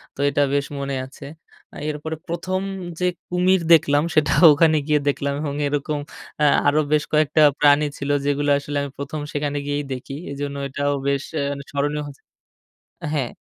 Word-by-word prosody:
তো - - -19
এটা 145 0 +1
বেশ 140 0 +1
মনে 140 0 -3
আছে। 140 +2 -12 0.6
এরপরে 155 +1 -4
১ম 185 +2 -2 0.4
যে 180 - 0 0.2
কুমির 180 +1 +2
দেখলাম, 145 -2 +4
সেটা 155 -2 +3 0.2
ওখানে 160 +1 +4
গিয়ে 150 -1 +3
দেখলাম। 140 0 0
এবং 145 -2 -3
এরকম 145 +1 -2 0.4
আ - - +4 0.2
আরো 145 +2 +4
বেশ 150 -1 +3
কয়েকটা 155 0 +3 0.2
প্রাণী 145 +1 +5
ছিল, 140 - -4 0.2
যেগুলো 145 0 0
আসলে 145 0 -4
আমি 140 - -4
১ম 140 +2 -5
সেখানে 145 0 -2
গিয়েই 145 0 -1
দেখি। 130 +1 -7 0.2
এজন্য 140 0 -4
এটাও 145 +1 -1
বেশ 140 -1 0
এ্যা 140 -1 -1 0.2
স্মরণীয় 145 +1 -1
হচ্ছে 140 -1 -12 0.9
হ্যাঁ। 135 -5 -1
145 Hz, 160 wpm, -22 LUFS, 140-150 Hz, 0.9 s, প্রাণী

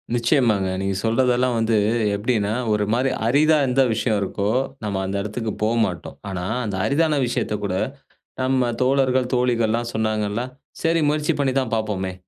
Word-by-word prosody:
நிச்சயமாங்க. 115 -5 +2
நீங்க 95 0 -1
சொல்றதெல்லாம் 125 +1 +2
வந்து 115 -1 +2 0.4
எப்பிடின்னா, 105 -1 0 0.2
ஒருமாரி 110 +6 +1 0.2
அரிதா 155 +5 +4
எந்த 130 +2 +2
விஷயம் 110 -1 0
இருக்கோ, 100 +1 -2 0.3
நம்ம 100 -2 -2
அந்த 95 +1 -3
இடத்துக்கு 110 +2 -3
போ 110 - +3 0.2
மாட்டோம். 90 -3 -6
ஆனா, 90 -2 -4 0.2
அந்த 100 - -3
அரிதான 150 +1 +2
விஷயத்த 110 -3 -1
கூட 95 -2 -1 0.7
நம்ம 130 -2 +1
தோழர்கள், 130 -1 +2
தோழிகள்லாம் 120 -1 +1
சொன்னாங்கள்ல, 110 0 -1 0.4
"சரி 165 0 +2
முயற்சி 150 0 +1
பண்ணி 135 -2 +1
தான் 125 -3 -4
பாப்போமே!" 95 -4 -2
115 Hz, 140 wpm, -22 LUFS, 105-130 Hz, 0.7 s, அரிதா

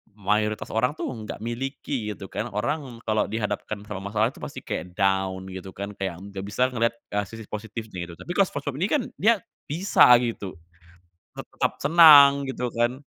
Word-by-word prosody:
mayoritas 105 +1 -1
orang 125 +6 +1
tuh - - -3
nggak 110 -4 -7
miliki 120 -1 -4
gitu 95 - -9
kan, - - -3
orang 120 +10 -1 0.3
kalau 110 0 +2
dihadapkan 105 -1 -3
sama 105 -2 -5
masalah 110 +2 +2
itu - - -15
pasti - - -6
kayak 90 0 -5
down 95 -1 +1
gitu 95 0 -8
kan 100 +1 -5
kayak 95 -3 -3
nggak 100 -1 -7
bisa 125 +5 +1
ngelihat, 115 -1 0 0.2
eh, 105 - +1
sisi 115 0 -10
positifnya 105 -4 -6
itu, - - -8
tapi 175 - -7
kalo 195 - +5
SpongeBob 145 -3 -5
ini 190 - +1
kan, 290 -5 +2 0.2
dia 225 +1 +4 0.3
bisa 175 +3 +4 0.2
gitu, 105 -5 -4 0.8
tetap - - -3
senang 140 -3 +8
gitu 125 -2 -2
kan, 120 +3 0
110 Hz, 175 wpm, -25 LUFS, 100-140 Hz, 0.8 s, senang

